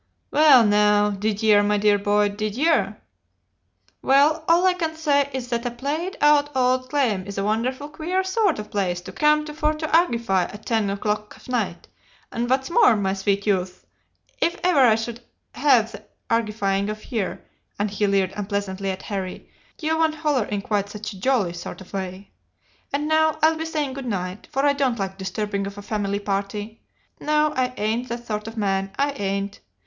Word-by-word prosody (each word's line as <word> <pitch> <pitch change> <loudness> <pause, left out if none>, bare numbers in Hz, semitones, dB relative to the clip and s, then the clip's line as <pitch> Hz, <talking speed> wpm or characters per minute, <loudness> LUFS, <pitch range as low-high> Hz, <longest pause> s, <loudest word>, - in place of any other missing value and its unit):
"'Well, 285 -6 +7
now, 210 0 +4
did 210 +2 -2
yer, 210 -2 +6
my 205 0 +2
dear 205 0 +3
boy 205 +1 +2
did 210 +1 -4
yer? 290 -7 +2 1.0
Well, 290 +4 +4
all 340 +2 +4
I 370 - +5
can 325 -3 -3
say 285 -3 +2
is 255 -2 -5
that 235 0 -1
a - - 0
played 290 +10 -4
out 295 -1 +4
old 255 0 +1
claim 230 -10 0
is 200 - -7
a 195 - 0
wonderful 245 +7 -1
queer 340 +5 -2
sort 380 -1 +1
of 210 0 -7
place 190 -4 -1
to - - -9
come 300 0 +2
to 300 - -7
for 305 0 0
to 310 +1 -4
argify 235 - +2
at 210 +1 -12
ten 220 -4 +1
o'clock 210 +1 -3
of - - -17
night, 225 -8 -2 0.4
and 240 +1 -2
what's 265 +3 0
more, 415 - +5
my 195 -2 0
sweet 200 0 -1
youth, 185 -3 -1 0.6
if 340 - +1
ever 360 -5 +3
I 240 -5 +6
should 230 +1 -4 0.3
'ave 240 -6 +3
the - - -10 0.3
argifying 210 -3 0
of 215 +3 -7
yer' 215 -6 -2 0.4
and 205 0 -1
he 205 0 0
leered 195 -2 +1
unpleasantly 200 -1 -3
at 190 0 -4
Harry 190 -3 -5 0.3
'yer 315 0 0
won't 315 -1 0
'oller 275 -7 +2
in 205 -1 -3
quite 205 -1 -1
such 210 0 -6
a 190 - -12
jolly 210 -6 +1
sort 175 +4 -7
'o 190 - -11
way. 190 +1 -6 0.6
And 290 +2 -1
now 315 0 +3
I'll 320 +1 +5
be 320 0 -4
saying 300 -4 -2
good 270 -1 -6
night, 185 -2 -4
for 270 +2 +1
I 285 - +4
don't 270 -4 0
like 195 -1 -4
disturbing 200 +1 -3
of 200 0 -9
a 205 - -8
family 200 -1 -2
party. 205 +2 -4 0.4
No, 300 0 +1
I 250 -1 0
ain't 225 +4 -1
that 235 0 -5
sort 210 -1 -4
of 225 +1 -8
man, 195 -2 0
I 285 +1 +1
ain't. 200 -4 -3
220 Hz, 195 wpm, -23 LUFS, 200-285 Hz, 1.0 s, Well